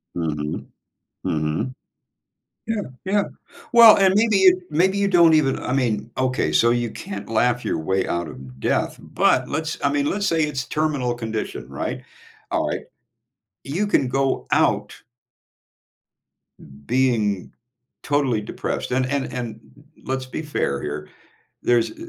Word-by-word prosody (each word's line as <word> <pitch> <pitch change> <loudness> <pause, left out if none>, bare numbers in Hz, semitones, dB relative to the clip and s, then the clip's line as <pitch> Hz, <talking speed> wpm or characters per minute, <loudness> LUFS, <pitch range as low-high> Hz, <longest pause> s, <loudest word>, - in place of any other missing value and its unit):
Mhm. 75 -3 -3 0.6
Mhm. 80 +11 -1 0.9
Yeah, 225 -2 -1 0.2
yeah. 200 +2 +2 0.5
Well, 230 -2 +9
and 190 -1 +4
maybe 215 -2 +4
you 185 -1 +5
maybe 185 +6 +2
you 200 - +2
don't 170 -3 +6
even 140 -4 +2
I - - -4
mean 115 -4 0
okay, 130 -1 0
so 115 - +4
you 120 -1 0
can't 100 +1 -7
laugh 120 +2 +1
your - - -1
way 95 +4 0
out 85 -1 -1
of 65 -1 -11
death, - - 0
but - - +1
let's 160 +2 -3
I 140 - +3
mean, 145 0 +1
let's 200 +4 0
say 160 -2 +2
it's 135 -4 -2
terminal 145 -6 -1
condition, 115 -2 -5
right? - - -4 0.5
Alright. - - -1 0.8
You 175 +10 -1
can 135 -10 +2
go 135 +1 0
out - - +2 1.9
being 115 -7 +1 0.5
totally 140 -6 +1
depressed, 105 - -4
and 130 0 +1
and 140 0 -2
and 115 -3 -5 0.4
let's 130 0 -3
be 140 - -5
fair 70 - -1
here, 75 +1 -5 0.5
there's 120 -1 +2
i - - -15
130 Hz, 140 wpm, -22 LUFS, 110-160 Hz, 1.9 s, Well